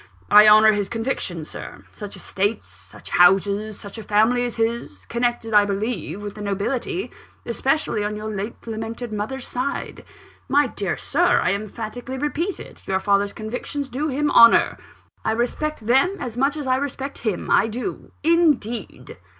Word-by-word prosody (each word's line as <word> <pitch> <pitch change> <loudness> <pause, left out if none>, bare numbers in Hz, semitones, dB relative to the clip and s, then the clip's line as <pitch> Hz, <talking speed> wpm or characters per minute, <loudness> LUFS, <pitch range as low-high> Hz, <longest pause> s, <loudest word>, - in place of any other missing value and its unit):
I 210 +1 +9
honour 215 +1 +8
his 205 -2 -1
convictions, 225 - -3
sir. - - -9
Such 205 -1 -8
estates, 205 +3 -2
such - - -15
houses, 200 +4 +3
such 200 +2 -9
a - - -7
family 220 +4 +3
as 240 - -4
his 230 +1 -2
connected, 235 -1 -1
I 210 -1 +7
believe, 205 -1 -3
with 205 -1 -5
the 210 - -9
nobility, 240 - -2 0.3
especially 265 -2 0
on 210 +1 -2
your 215 +1 -5
late 205 +3 -6
lamented 225 +1 -5
mother's 230 +5 -4
side. 250 +3 -4 0.5
My 290 +2 +4
dear 200 -7 -3
Sir, 350 +5 +2
I - - +2
emphatically 225 +5 -5
repeat 300 +7 -2
it, - - -12
your 190 0 +1
father's 200 0 +1
convictions 250 +5 -5
do 285 +5 -2
him 295 +1 0
honour; 230 0 +6 0.4
I 220 - +1
respect 240 +2 -2
them 270 - +3
as 235 -3 -5
much 275 +4 +1
as 295 - -4
I 255 0 +2
respect 275 0 -4
him; 215 -6 -2
I 215 - +4
do, 245 - -5
indeed." 280 - 0
225 Hz, 160 wpm, -22 LUFS, 205-265 Hz, 0.5 s, I